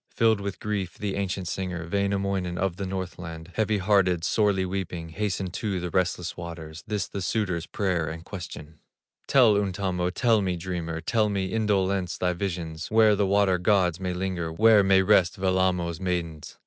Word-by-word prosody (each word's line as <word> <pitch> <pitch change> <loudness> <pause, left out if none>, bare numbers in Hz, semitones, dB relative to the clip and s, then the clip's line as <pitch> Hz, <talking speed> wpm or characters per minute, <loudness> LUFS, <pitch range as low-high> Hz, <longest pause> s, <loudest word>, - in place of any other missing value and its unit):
Filled 110 -3 +2
with 100 -1 -5
grief, 100 -4 -3
the 100 -2 -3
ancient 95 -2 -2
singer, 90 -2 -4
Wainamoinen 100 -2 -1
of 95 -2 -1
the 100 0 -3
Northland, 90 -3 -6
Heavy 110 -1 +1
hearted, 95 -4 +2
sorely 100 -2 +2
weeping, 90 -3 -4
Hastened 95 0 -3
to 100 -2 -2
the 90 -1 -4
restless 90 -1 -1
waters, 80 -2 -8
This 105 -3 -2
the 100 - -5
suitor's 95 -4 -1
prayer 90 -5 -1
and 80 +1 -8
question: 80 -5 -8 0.5
"Tell, 120 -6 +5
Untamo, 95 -3 -1
tell 110 +3 +2
me, 95 -2 -1
dreamer, 85 -2 -4
Tell 110 +5 +1
me, 95 -1 -2
Indolence, 100 -4 0
thy 90 0 0
visions, 85 -3 -4
Where 110 -1 +5
the 100 -1 +1
water 100 -2 +3
gods 90 -2 +2
may 90 -1 -2
linger, 90 -3 -2
Where 105 +4 +5
may 95 0 +4
rest 95 -3 +3
Wellamo's 95 -3 +1
maidens?" 85 -4 -3
95 Hz, 165 wpm, -26 LUFS, 90-100 Hz, 0.5 s, Tell